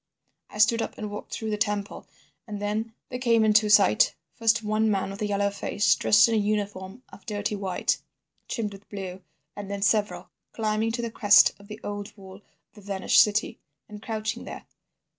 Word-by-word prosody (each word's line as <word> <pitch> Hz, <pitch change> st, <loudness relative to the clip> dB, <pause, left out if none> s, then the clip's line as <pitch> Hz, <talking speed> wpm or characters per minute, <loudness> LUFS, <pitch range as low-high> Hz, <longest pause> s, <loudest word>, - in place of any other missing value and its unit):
"I -, -, -11 dB
stood 225 Hz, +2 st, +4 dB
up -, -, -5 dB
and 210 Hz, -1 st, -5 dB
walked 205 Hz, -, -8 dB
through 220 Hz, -1 st, -4 dB
the 210 Hz, -, -1 dB
temple, 205 Hz, -1 st, -2 dB, 0.4 s
and 210 Hz, -2 st, -6 dB
then 215 Hz, +2 st, -3 dB
there 250 Hz, -, -5 dB
came 230 Hz, -3 st, +3 dB
into 215 Hz, 0 st, +4 dB
sight—first 205 Hz, -, +3 dB
one 215 Hz, +1 st, +1 dB
man 195 Hz, -2 st, -1 dB
with 200 Hz, +2 st, -9 dB
a 210 Hz, -, 0 dB
yellow 200 Hz, 0 st, 0 dB
face, 205 Hz, +1 st, +1 dB
dressed 210 Hz, +1 st, +5 dB
in 230 Hz, -, -1 dB
a -, -, +2 dB
uniform 205 Hz, +1 st, -3 dB
of 195 Hz, -, -15 dB
dirty 205 Hz, 0 st, -2 dB
white, 190 Hz, -3 st, -1 dB, 0.5 s
trimmed 210 Hz, -4 st, -3 dB
with 195 Hz, +1 st, -15 dB
blue, 190 Hz, -2 st, -7 dB, 0.3 s
and 205 Hz, -1 st, -7 dB
then 200 Hz, 0 st, -3 dB
several, 200 Hz, -4 st, 0 dB, 0.2 s
climbing 220 Hz, 0 st, -1 dB
to 235 Hz, 0 st, -3 dB
the 230 Hz, -, -3 dB
crest 205 Hz, -2 st, +6 dB
of 200 Hz, -, -16 dB
the 210 Hz, +1 st, -9 dB
old 205 Hz, +1 st, -6 dB
wall 190 Hz, -1 st, -12 dB
of 205 Hz, -, -23 dB, 0.3 s
the 210 Hz, -, -15 dB
vanished 195 Hz, -1 st, +3 dB
city, 210 Hz, 0 st, 0 dB, 0.3 s
and 210 Hz, -1 st, -11 dB
crouching 220 Hz, +1 st, -4 dB
there. -, -, -9 dB
210 Hz, 190 wpm, -26 LUFS, 200-220 Hz, 0.5 s, crest